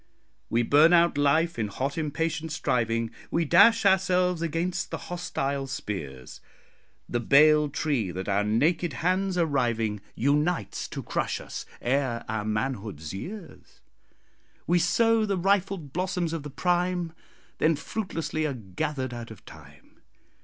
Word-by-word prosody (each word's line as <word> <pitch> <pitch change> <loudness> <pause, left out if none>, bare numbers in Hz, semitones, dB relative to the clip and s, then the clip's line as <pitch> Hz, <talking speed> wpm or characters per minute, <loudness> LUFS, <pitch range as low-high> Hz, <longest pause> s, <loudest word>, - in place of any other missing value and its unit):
We 120 +1 +2
burn 150 +8 +5
out 170 -2 +5
life 150 +2 +2
in 110 - 0
hot 135 +8 -3
impatient 160 +1 -2
striving; 115 -6 0 0.2
We 170 0 0
dash 225 +8 +6
ourselves 180 -2 +3
against 170 +2 -2
the - - -4
hostile 140 -6 -3
spears: 70 - -6 0.7
The 120 - -1
bale 150 +4 +5
tree, 140 -8 -1
that 95 +2 -5
our 100 0 +1
naked 150 +10 +1
hands 185 0 +1
are 170 - +3
riving, 115 -7 0
Unites 150 +7 0
to - - -6
crush - - -2
us. - - -7 0.2
Ere 130 -2 0
our 110 -1 -3
manhood's 105 - -3
years, 175 - -9 0.9
We 175 +1 +3
sow 225 +6 +3
the 200 -2 0
rifled 190 -5 0
blossoms 180 -2 -1
of 165 - -3
the 145 - -7
prime, 175 +2 0 0.5
Then 160 +1 +3
fruitlessly 155 -3 -3
are 140 - -3
gathered 125 +5 -4
out 120 -1 -7
of 110 - -13
time. 75 -2 -16
150 Hz, 140 wpm, -27 LUFS, 115-175 Hz, 0.9 s, dash